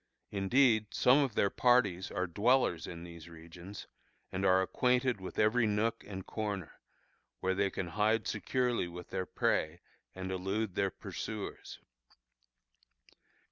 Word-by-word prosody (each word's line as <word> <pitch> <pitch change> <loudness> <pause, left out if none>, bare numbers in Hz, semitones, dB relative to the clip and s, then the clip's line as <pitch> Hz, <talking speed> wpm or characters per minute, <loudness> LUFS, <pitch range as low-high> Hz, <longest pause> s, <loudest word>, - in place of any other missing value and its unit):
Indeed, 110 +2 +3
some 125 +3 +5
of 135 -7 0
their 100 - +2
parties 105 -8 +3
are 90 -2 -1
dwellers 105 -1 +2
in 85 -1 -7
these 85 -1 -10
regions, 85 +4 -10 0.5
and 95 +1 -3
are 95 0 +5
acquainted 125 +1 +1
with 95 - -7
every 110 +2 +3
nook 110 +2 0
and 95 -2 -6
corner, 100 -6 -4 0.6
where 95 0 0
they 100 +1 +1
can 90 -2 -4
hide 105 +4 +1
securely 120 -1 0
with 90 0 -10
their 95 -1 -2
prey 80 +2 0 0.4
and 95 0 -5
elude 95 +2 -2
their 100 +1 +1
pursuers. - - -6
100 Hz, 135 wpm, -32 LUFS, 90-115 Hz, 0.6 s, some